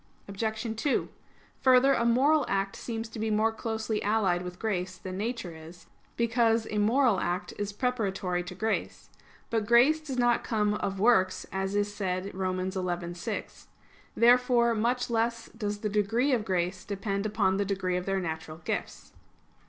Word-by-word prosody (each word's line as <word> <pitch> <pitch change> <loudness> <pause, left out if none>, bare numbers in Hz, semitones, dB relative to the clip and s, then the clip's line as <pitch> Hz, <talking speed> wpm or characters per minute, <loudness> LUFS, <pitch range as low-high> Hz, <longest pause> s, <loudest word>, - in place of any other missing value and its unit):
Obj. 220 +2 -3
2: 290 - +1 0.5
Further, 260 +1 +6
a 235 - +1
moral 275 +6 +4
act 195 0 -1
seems 225 -1 -5
to 225 - -8
be 220 0 -1
more 215 +1 +2
closely 220 -1 -3
allied 200 -4 +1
with 180 0 -7
grace 185 -4 -2
than 185 +1 -7
nature 205 -4 -4
is; 165 +2 -12 0.3
because 230 -1 +2
a 210 - 0
moral 230 0 +3
act 180 0 -2
is 205 0 -2
preparatory 200 -6 -1
to 180 - -8
grace. 220 +4 -3 0.4
But 220 -2 0
grace 245 +7 +5
does 275 -5 -5
not 240 -1 +3
come 210 -2 +1
"of 195 -2 -3
works," 200 -4 +3
as 195 +1 -2
is 205 0 0
said 190 -1 -3
Rom. 185 -1 -2
11:6. 180 -2 -4 0.5
Therefore 240 0 +5
much 240 +3 0
less 230 0 0
does 210 -2 -4
the 215 - -1
degree 215 +6 +1
of 225 -4 0
grace 185 0 -1
depend 200 +1 -2
upon 205 -3 +1
the 200 - +1
degree 190 -2 -1
of 180 +1 -3
their 195 0 +1
natural 160 -2 -5
gifts. 160 - -5
210 Hz, 160 wpm, -28 LUFS, 185-230 Hz, 0.5 s, Further